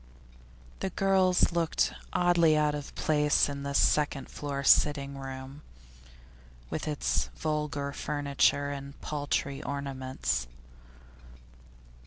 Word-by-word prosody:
The 190 Hz, -, -2 dB
girls 190 Hz, -1 st, +3 dB
looked 170 Hz, -1 st, +1 dB, 0.2 s
oddly 170 Hz, -3 st, +4 dB
out 150 Hz, -1 st, +2 dB
of 145 Hz, -1 st, -6 dB
place 150 Hz, -1 st, +2 dB
in 140 Hz, -1 st, -5 dB
this 140 Hz, 0 st, -1 dB
second 145 Hz, -2 st, +2 dB
floor 140 Hz, -1 st, -4 dB
sitting 140 Hz, -1 st, +4 dB
room, 135 Hz, +1 st, -8 dB, 1.1 s
with -, -, -3 dB
its -, -, 0 dB
vulgar 150 Hz, -, -2 dB
furniture 145 Hz, 0 st, +1 dB
and 140 Hz, 0 st, -8 dB
paltry 145 Hz, -1 st, -2 dB
ornaments. 130 Hz, -, -3 dB
145 Hz, 100 wpm, -29 LUFS, 140-150 Hz, 1.1 s, oddly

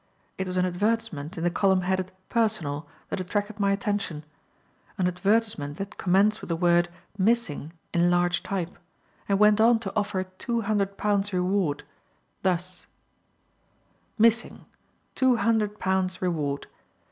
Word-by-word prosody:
It 190 Hz, -, -1 dB
was 185 Hz, 0 st, -3 dB
an 180 Hz, -, +3 dB
advertisement 185 Hz, -4 st, -1 dB
in 165 Hz, -, -3 dB
the 175 Hz, -, +2 dB
column 190 Hz, +1 st, +3 dB
headed 185 Hz, 0 st, -1 dB, 0.2 s
"Personal" 165 Hz, -11 st, 0 dB, 0.2 s
that -, -, -2 dB
attracted 205 Hz, +3 st, -2 dB
my 200 Hz, -1 st, +3 dB
attention, 200 Hz, -6 st, -2 dB, 0.7 s
an 185 Hz, -, +1 dB
advertisement 180 Hz, -5 st, 0 dB
that 195 Hz, +1 st, -6 dB
commenced 200 Hz, +4 st, +3 dB
with -, -, -8 dB
the 170 Hz, -, 0 dB
word 175 Hz, 0 st, +3 dB, 0.3 s
"Missing," 190 Hz, -8 st, +1 dB, 0.2 s
in 175 Hz, 0 st, +3 dB
large 175 Hz, 0 st, +2 dB
type, 180 Hz, -3 st, -4 dB, 0.5 s
and 200 Hz, -, +3 dB
went 210 Hz, +1 st, +5 dB
on 230 Hz, +1 st, +6 dB
to 195 Hz, -2 st, -5 dB
offer 200 Hz, -3 st, 0 dB
Two 190 Hz, +6 st, -3 dB
Hundred 200 Hz, -2 st, 0 dB
Pounds 205 Hz, -1 st, +1 dB
Reward: 180 Hz, -4 st, 0 dB, 0.6 s
thus: 180 Hz, -1 st, -2 dB, 1.3 s
"MISSING. 230 Hz, +1 st, +2 dB, 0.5 s
TWO 260 Hz, -2 st, +3 dB
HUNDRED 215 Hz, -1 st, +1 dB
POUNDS 185 Hz, -1 st, 0 dB
REWARD. 150 Hz, -6 st, -1 dB
190 Hz, 135 wpm, -26 LUFS, 175-210 Hz, 1.3 s, on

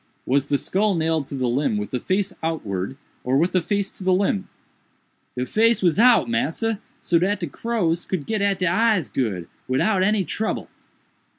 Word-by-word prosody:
was 140 Hz, +1 st, +1 dB
the 145 Hz, -, +2 dB
skull 200 Hz, +6 st, +1 dB
nailed 160 Hz, -3 st, 0 dB
to 140 Hz, -, -5 dB
the 130 Hz, -1 st, -1 dB
limb 125 Hz, -2 st, +1 dB
with 105 Hz, -, -4 dB
the 125 Hz, -, -1 dB
face 195 Hz, +5 st, -1 dB
outwards, 110 Hz, -, -3 dB, 0.3 s
or 130 Hz, +2 st, +1 dB
with 170 Hz, +5 st, +2 dB
the 185 Hz, -, +2 dB
face 200 Hz, +2 st, -1 dB
to -, -, -10 dB
the 185 Hz, -, +2 dB
limb?" 195 Hz, +1 st, +1 dB, 0.9 s
"De 125 Hz, -, -1 dB
face 225 Hz, -, +2 dB
was 175 Hz, +2 st, +3 dB
out, 235 Hz, -, +6 dB
massa, 165 Hz, -, -1 dB, 0.2 s
so 170 Hz, -, +2 dB
dat 195 Hz, +4 st, 0 dB
de -, -, 0 dB
crows 175 Hz, -, -1 dB
could 175 Hz, -7 st, -3 dB
get 215 Hz, -2 st, -1 dB
at 200 Hz, -1 st, +2 dB
de 185 Hz, -, -1 dB
eyes 195 Hz, -, +2 dB
good, 100 Hz, -10 st, -2 dB, 0.2 s
widout 185 Hz, +10 st, +2 dB
any 205 Hz, 0 st, +2 dB
trouble." 220 Hz, +5 st, -3 dB
175 Hz, 190 wpm, -23 LUFS, 135-205 Hz, 0.9 s, out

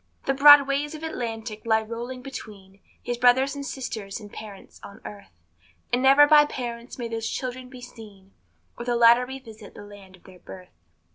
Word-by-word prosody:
The 270 Hz, -, +1 dB
broad 285 Hz, 0 st, +8 dB
waves 290 Hz, +2 st, -2 dB
of 310 Hz, -, -10 dB
Atlantic 225 Hz, -7 st, -6 dB
lie 220 Hz, -1 st, +1 dB
rolling 240 Hz, +3 st, -7 dB
between 200 Hz, -7 st, -11 dB, 0.2 s
His 240 Hz, 0 st, -4 dB
brothers 260 Hz, +3 st, +3 dB
and 285 Hz, -1 st, -7 dB
sisters 225 Hz, -8 st, -6 dB
and 205 Hz, -2 st, -13 dB
parents 205 Hz, -3 st, -12 dB
on 200 Hz, +2 st, -12 dB
earth; 205 Hz, -1 st, -11 dB, 0.6 s
And 245 Hz, -, +2 dB
never 275 Hz, +2 st, +6 dB
by 295 Hz, 0 st, +6 dB
parents 240 Hz, -3 st, -7 dB
may 240 Hz, -2 st, -5 dB
those 225 Hz, -1 st, -4 dB
children 255 Hz, 0 st, -6 dB
be 255 Hz, -1 st, -12 dB
seen, 210 Hz, -5 st, -14 dB, 0.5 s
Or -, -, -5 dB
the 240 Hz, 0 st, -1 dB
latter 235 Hz, +1 st, +5 dB
revisit 225 Hz, -6 st, -11 dB
the -, -, -11 dB
land 200 Hz, -2 st, -15 dB
of 185 Hz, -, -25 dB
their 185 Hz, -1 st, -16 dB
birth. 185 Hz, 0 st, -13 dB
235 Hz, 185 wpm, -24 LUFS, 215-265 Hz, 0.6 s, broad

